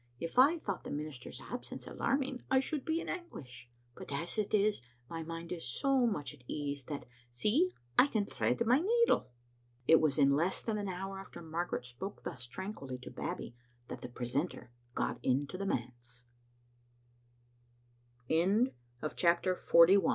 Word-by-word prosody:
If 165 +9 -1
I 290 +6 +7
thought 200 - -4
the - - -6
minister's 145 -4 -5
absence 245 - -6
alarming, 270 -2 -1
I 265 - +5
should 275 +1 -2
be 320 +1 0
in - - -7
anguish; 135 - -7 0.2
but - - -9
as 165 +9 -2
it 210 - 0
is, 210 -3 +3 0.3
my 165 +3 -5
mind 165 +1 -6
is 165 -7 -3
so 265 - +3
much 150 - -2
at 140 -4 -17
ease 145 -2 -3
that, 145 -2 -5 0.3
see, 235 - +3 0.3
I 270 - +8
can 215 -7 0
thread 235 - 0
my 250 +4 +5
needle." 465 - +3 0.6
It 160 - +7
was 155 -2 +2
in 140 -1 +5
less 170 +6 +1
than 215 -2 -1
an 205 - -2
hour 195 +1 -4
after 195 - -9
Margaret 165 -4 -2
spoke 125 +12 -6
thus 125 0 -4
tranquilly 140 - -5
to 125 - -9
Babbie - - -4 0.4
that - - -6
the 125 - -6
precento 125 +4 -2
175 Hz, 140 wpm, -34 LUFS, -, 0.6 s, I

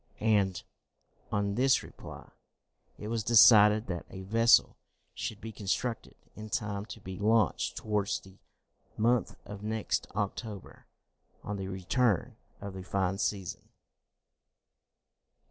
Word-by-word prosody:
And, 100 -4 +1 0.7
on 100 0 0
this 130 +4 +3
reply, - - -11 0.7
it 105 - -7
was 115 0 -2
decided 110 -1 +7
that 90 -2 -5
a 95 - -8
vessel 115 +4 +4 0.4
should 105 - -5
be 110 0 -7
constructed 110 +3 -3 0.2
in 110 0 -8
time 105 -3 -3
to 115 - -9
be 95 -3 -8
launched 110 -1 +1
towards 105 -2 -1
the 95 0 -18 0.6
month 120 +1 +1
of 100 0 -9
next 105 -1 -2
October, 105 0 -5 0.6
on 105 0 -4
the 95 -1 -5
return 95 +3 0 0.2
of 100 -1 -7
the 95 - -7
fine 95 0 -1
season. 100 -4 -3
105 Hz, 120 wpm, -30 LUFS, 95-110 Hz, 0.7 s, decided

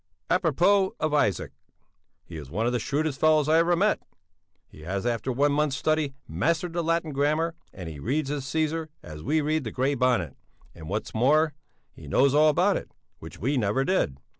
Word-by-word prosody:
A 180 - +4
propos 190 +4 +2
of 155 -1 -1
Isaac! 105 - +1 0.7
He 85 - -11
is 75 -4 -8
one 105 +9 -2
of 120 - +1
the 125 - +1
shrewdest 145 +3 -2
fellows 155 -2 +4
I 160 +1 +4
ever 170 +1 +3
met. 205 +5 +1 0.7
He 75 - -16
has, 95 +6 -4
after 120 +1 -1
one 140 +4 +2
month's 145 -2 0
study, 155 -3 0
mastered 165 - -1
the 170 0 -1
Latin 165 -1 0
grammar, 155 +4 +1 0.2
and 90 -3 -9
he 80 -3 -8
reads 140 - -1
his 145 -2 -3
Cæsar 160 +2 -1 0.2
as 75 0 -9
we 155 - +1
read 155 +1 0
the 115 - -4
Grey 130 +6 0
Bonnet; 120 - 0 0.4
and 80 0 -10
what's 105 +3 -3
more, 150 +7 +3 0.4
he 75 - -13
knows 135 - +3
all 155 +1 +5
about 150 - +2
it, - - -8 0.3
which 80 0 -11
we 135 +6 -1
never 120 +4 +1
did. 135 - 0
145 Hz, 195 wpm, -26 LUFS, 110-155 Hz, 0.7 s, all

